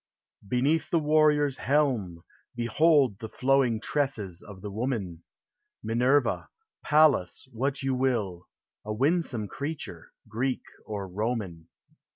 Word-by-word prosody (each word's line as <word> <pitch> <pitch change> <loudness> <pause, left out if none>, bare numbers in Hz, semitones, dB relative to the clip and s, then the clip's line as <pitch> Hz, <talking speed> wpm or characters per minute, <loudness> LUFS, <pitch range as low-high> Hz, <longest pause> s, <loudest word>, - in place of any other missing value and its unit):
Beneath 135 +9 +1
the 170 - +2
warrior's 150 -2 +3
helm, 125 - 0 0.3
behold 130 -1 +3
The 110 - -6
flowing 130 -3 +2
tresses 110 - -2
of 100 -3 -12
the 105 - -5
woman! 105 -7 -3 0.6
Minerva, 125 +6 +1 0.3
Pallas, 150 -11 +3
what 135 +4 -2
you 135 0 +1
will 115 -9 -1 0.2
— - - -66
A 105 - -5
winsome 130 -2 0
creature, 145 +7 -6 0.2
Greek 125 +4 -2 0.2
or 100 -3 -4
Roman. 95 -4 -3
125 Hz, 115 wpm, -27 LUFS, 105-140 Hz, 0.6 s, warrior's